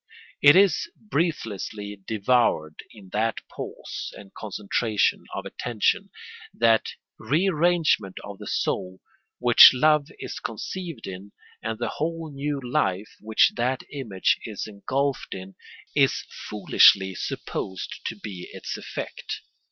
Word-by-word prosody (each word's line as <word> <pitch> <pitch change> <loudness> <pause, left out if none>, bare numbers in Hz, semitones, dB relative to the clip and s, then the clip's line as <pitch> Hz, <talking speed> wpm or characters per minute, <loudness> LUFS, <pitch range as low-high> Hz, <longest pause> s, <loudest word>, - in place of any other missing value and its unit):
It 145 +2 +8
is 195 - +4
breathlessly 110 - -3
devoured 105 -8 +1
in 100 -4 -15
that 110 +3 -1
pause - - -7
and 100 -1 -13
concentration 105 +1 0
of - - -5
attention, 120 -3 -1 0.5
that 115 -1 +4 0.3
rearrangement 165 - +2
of 100 -1 -9
the - - -8
soul, 95 0 -2 0.4
which 120 +1 +9
love 150 +1 +4
is - - -6
conceived 165 - -5
in; 95 +2 -8 0.3
and 110 0 -3
the 120 - -2
whole 165 +2 -3
new 140 +1 -2
life 105 -6 -1
which 110 0 +4
that 125 +2 0
image 115 -10 0
is 105 -3 -5
engulfed 130 +7 -2
in 95 +1 -9 0.4
is - - +3 0.3
foolishly 95 -2 +5
supposed 95 +1 -5
to - - -3
be 100 -4 -8
its - - -5
effect. - - -6
115 Hz, 120 wpm, -25 LUFS, 100-145 Hz, 0.5 s, which